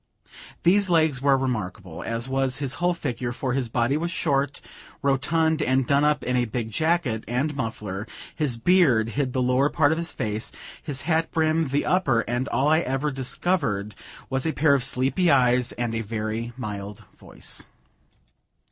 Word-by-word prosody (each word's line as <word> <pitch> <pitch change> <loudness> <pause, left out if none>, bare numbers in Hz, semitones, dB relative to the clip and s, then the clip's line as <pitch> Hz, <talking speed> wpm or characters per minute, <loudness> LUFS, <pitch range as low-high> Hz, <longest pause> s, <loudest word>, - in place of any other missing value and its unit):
These 190 +2 +4
legs 160 -6 +2
were 140 -1 +4
remarkable, 100 -9 -4
as 115 +2 -3
was 135 0 0
his 140 -2 0
whole 175 0 +2
figure, 125 -6 -3
for 125 +1 -3
his 130 -3 -1
body 120 +4 +1
was 170 +2 -2
short, 140 -5 0 0.4
rotund, 155 +4 +1
and 130 -2 +2
done 140 +3 +3
up 150 0 +2
in 125 - -1
a 125 -1 +2
big 110 0 -4
jacket, 155 -7 0
and 135 +6 -1
muffler; 105 -5 -4 0.3
his 140 -7 0
beard 130 -7 +3
hid 135 +1 -1
the 130 - +1
lower 130 +3 +2
part 145 -1 +3
of 160 - 0
his 170 -1 -2
face, 110 +1 -3 0.3
his 140 -3 -3
hat 160 +1 0
brim 160 0 +1
the 140 +2 0
upper; 140 -11 +2
and 120 +3 -2
all 140 0 +1
I 155 +1 +4
ever 140 -1 -1
discovered 130 - -1 0.3
was 130 +2 -1
a 160 - 0
pair 145 -1 +3
of 135 -3 +2
sleepy 135 +8 +2
eyes, 125 -3 +3
and 120 -1 -3
a 115 - -1
very 110 +2 -3
mild 105 -4 -6
voice. - - -9
135 Hz, 175 wpm, -24 LUFS, 120-155 Hz, 0.4 s, These